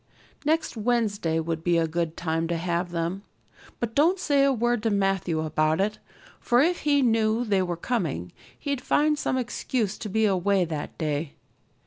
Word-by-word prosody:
Next 315 -1 0
Wednesday 215 -7 0
would 165 0 -3
be 175 -1 +2
a 165 - +2
good 165 0 -2
time 165 -1 -1
to 170 0 -1
have 175 +1 -1
them. 170 +3 -2 0.6
But 235 -2 -3
don't 330 +8 +3
say 285 -6 +2
a 275 - +4
word 240 -2 +1
to 225 - +1
Matthew 195 -5 0
about 155 +1 +1
it, 210 +2 0 0.4
for 240 - +2
if 340 +6 +3
he 285 -2 +2
knew 225 0 +2
they 200 -4 +2
were 175 -2 -2
coming 165 - -2 0.3
he'd 280 -3 -3
find 300 +3 +2
some 260 - 0
excuse 235 -3 -2
to 215 - -5
be 220 +2 +2
away 195 -1 +2
that 155 -3 -5
day. 150 -1 -2
200 Hz, 175 wpm, -26 LUFS, 165-240 Hz, 0.6 s, a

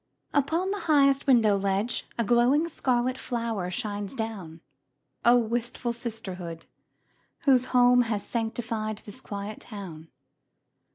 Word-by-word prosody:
Upon 325 +7 +1
the 410 - -2
highest 275 -2 +4
window 225 -6 +5
ledge 200 +3 -1
A 235 - +1
glowing 245 +8 +3
scarlet 255 -5 0
flower 230 -6 -2
shines 205 +3 -4
down. 195 -9 -5 0.6
Oh, 240 +1 +6
wistful 235 +1 -1
sisterhood, 190 -8 -6 0.8
whose 255 -3 +4
home 245 -1 +5
Has 225 -4 -2
sanctified 225 -2 -3
this 230 +5 -8
quiet 205 0 -6
town! 180 -7 -9
230 Hz, 115 wpm, -27 LUFS, 205-250 Hz, 0.8 s, Oh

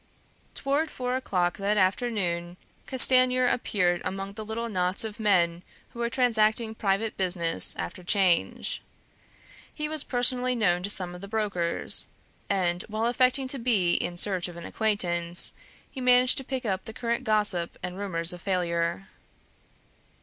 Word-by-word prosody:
Toward 285 +4 -1
four 250 -2 -3
o'clock 180 -9 -1
that 205 +1 0
afternoon 185 -4 0 0.3
Castanier 255 -1 +5
appeared 180 -8 +1
among 195 +1 -5
the 215 - -7
little 225 +2 -4
knots 185 -2 0
of 220 0 -7
men 175 -5 +2 0.3
who 235 - -12
were 235 0 0
transacting 225 -2 +1
private 215 +1 -1
business 175 - +2
after 85 - -6
'Change. 185 -2 +1 0.9
He 300 -1 -4
was 310 -1 -3
personally 250 0 +2
known 180 -6 +1
to 195 - -2
some 180 -3 -1
of 180 - -10
the 200 - -7
brokers; 200 -6 +1 0.4
and 180 -3 0
while 215 +1 -2
affecting 255 +2 +2
to 270 - -1
be 210 -8 +2
in 175 - -1
search 185 -1 +1
of 175 -1 -10
an 170 - -8
acquaintance, 175 -6 0 0.4
he 265 - -7
managed 250 +1 +4
to - - -7
pick 260 -1 -4
up 190 -3 -2
the 220 - -6
current 235 +2 -2
gossip 210 -6 0
and 180 0 -5
rumors 180 -3 0
of 175 - -10
failure. 170 -1 -1
205 Hz, 150 wpm, -27 LUFS, 180-240 Hz, 0.9 s, Castanier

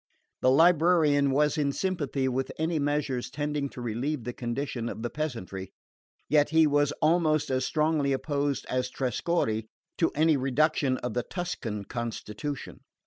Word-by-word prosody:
The 130 - +4
librarian 160 -1 +4
was 150 +3 +2
in 140 -1 +1
sympathy 145 -6 -1
with 130 +1 -1
any 160 0 0
measures 145 -4 -1
tending 145 0 -2
to 125 - -9
relieve 120 +4 -2
the 120 +2 -4
condition 120 -1 -3
of 110 - -6
the 120 - -3
peasantry; 115 - -4 0.6
yet 150 0 +3
he 160 0 +5
was 145 -1 +2
almost 155 -3 +3
as 130 0 +1
strongly 150 -2 +1
opposed 140 0 -1
as 125 0 -1
Trescorre 125 -4 -1 0.3
to 165 - +3
any 155 0 +4
reproduction 135 0 +1
of 125 - -2
the 120 - 0
Tuscan 120 - -4
constitution. 120 +4 -5
140 Hz, 145 wpm, -28 LUFS, 125-155 Hz, 0.6 s, he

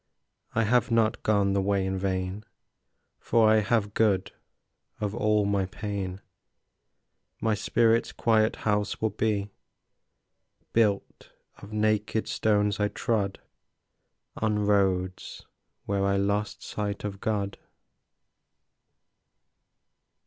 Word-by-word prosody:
I 115 - +3
have 120 +3 +2
not 115 -2 +2
gone 100 -2 +2
the 100 - +2
way 100 0 +1
in 95 0 -1
vain, 95 +1 -2 0.8
For 115 -2 +3
I 110 0 +5
have 105 -1 +1
good 100 -3 +2 0.7
of 105 -1 -2
all 105 -2 +2
my 100 -2 0
pain; 100 -2 -5 1.2
My 110 -1 +1
spirit's 115 +2 +2
quiet 110 -1 +2
house 105 -1 0
will 110 -1 0
be 105 -1 -1 1.2
Built 105 -4 0 0.3
of 100 - -12
naked 110 0 0
stones 105 -1 +1
I 105 - +2
trod 105 -3 -2 1.0
On 105 -1 0
roads 95 -3 0 0.4
where 100 0 0
I 100 0 +2
lost 100 +1 -1
sight 105 -1 -4
of 100 -1 -5
God. 100 -2 -2
105 Hz, 105 wpm, -27 LUFS, 100-110 Hz, 1.2 s, I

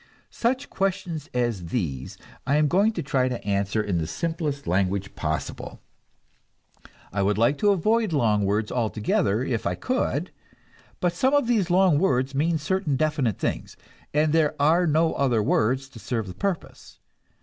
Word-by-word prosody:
Such 255 +3 -1
questions 185 -6 -2
as 120 -8 -1
these 75 - -3 0.3
I 140 - +3
am 150 0 +3
going 200 +8 +3
to - - -3
try 135 -3 +1
to 125 - -5
answer 100 +1 0
in 95 -5 -1
the 80 - -2
simplest 150 - -3
language 95 +2 0
possible. 80 -1 -4 1.3
I 100 - 0
would 100 +1 +1
avoid 200 - +2
long 110 -8 +2
words 105 +2 0
altogether, 110 -1 0
if 120 -4 -2
I - - -1
could; 180 - -1 0.7
but 175 -1 +1
some 260 +10 +2
of 285 - +3
these 220 -7 +1
long 180 -4 +4
words 130 -6 +1
mean 160 +4 +1
certain 155 -1 -1
definite 145 - 0
things, - - -3 0.3
and 150 +1 +2
there 155 -3 +2
are 165 +5 +4
no 160 +2 +2
other 120 -6 +1
words 130 +6 +1
to 120 - -12
serve 115 -1 -3
the 90 - -7
purpose. 195 - -5
140 Hz, 155 wpm, -25 LUFS, 110-170 Hz, 1.3 s, long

